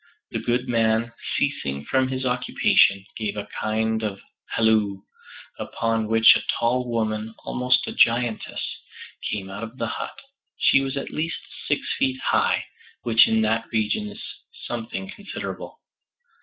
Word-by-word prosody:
The - - -1
good 120 +1 0
man, 115 0 +2 0.2
ceasing 70 +1 -1
from 130 - +2
his 130 0 -3
occupation, 125 -5 +3
gave 105 -2 -3
a 105 0 -4
kind 110 +1 0
of 100 -3 -3 0.3
halloo, 110 -3 +2 0.6
upon 115 -1 -1
which 115 +1 +7
a - - +1 0.2
tall 125 +1 +1
woman, 110 -1 -1
almost 125 0 +1
a - - -5
giantess, 115 -1 +2 0.6
came 95 -2 -4
out 100 +2 -6
of 115 +2 -7
the - - -1
hut. - - -5 0.4
She 135 - +5
was 135 0 -3
at 140 - -4
least 160 +2 -2 0.3
six - - +1 0.2
feet 130 0 +1
high, - - +2 0.4
which 115 -1 +6
in 110 0 +3
that 110 +1 +1
region 115 - 0
is 210 +2 -10 0.4
something 110 -5 -4
considerable. 205 - -7
115 Hz, 140 wpm, -24 LUFS, 110-125 Hz, 0.6 s, which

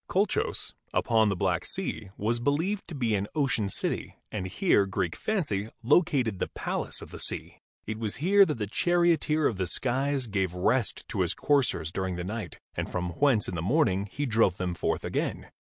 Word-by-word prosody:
Colchos, 195 +2 0 0.2
upon 110 -2 +3
the 100 - 0
Black 90 -2 0
Sea, 170 - -3
was 115 +3 0
believed 165 - 0
to 165 - -7
be 120 -5 0
an 100 0 0
ocean 130 -9 +1
city, - - -3
and 95 -3 -3
here 100 - +3
Greek 90 -3 -1
fancy 115 - -1
located 125 - +3
the - - 0
Palace - - -2
of - - -11
the - - -8
Sea. - - -3 0.3
It 110 +1 -4
was 110 -3 -2
here 200 +7 +5
that 155 - -1
the 105 - -1
charioteer 165 - +2
of 110 - +1
the 95 -1 -1
skies 135 +4 0
gave 95 -5 -1
rest 105 +6 +1
to - - -1
his - - 0
coursers 135 - +1
during 95 0 -2
the 90 - -4
night 110 +4 -5 0.2
and - - -2
from 90 -1 -2
whence 130 -8 +3
in - - -4
the 85 - -2
morning 100 - +2
he 145 +7 -2
drove 110 -6 +3
them 90 -1 -2
forth - - -1
again. - - -2
115 Hz, 190 wpm, -28 LUFS, 95-145 Hz, 0.3 s, here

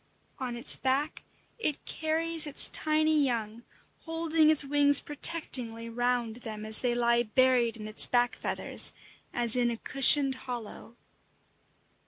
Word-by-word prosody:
On 250 -2 -5
its 240 - -1
back 275 +4 -3 0.3
it 305 -10 -3
carries 320 0 +1
its 285 - +2
tiny 310 -1 +1
young, 230 -3 -4 0.4
holding 325 -1 0
its 305 -2 +4
wings 285 0 +5
protectingly 250 -7 -2
round 240 -1 -2
them 215 -3 -8
as 215 0 0
they 245 -1 -2
lie 235 0 +1
buried 240 0 0
in 215 -1 -9
its 215 - -1
back 245 -1 0
feathers - - -1 0.4
as 240 -1 +1
in 245 -1 0
a 235 - -5
cushioned 275 +2 +4 0.2
hollow. 235 -1 -9
250 Hz, 135 wpm, -27 LUFS, 235-295 Hz, 0.4 s, wings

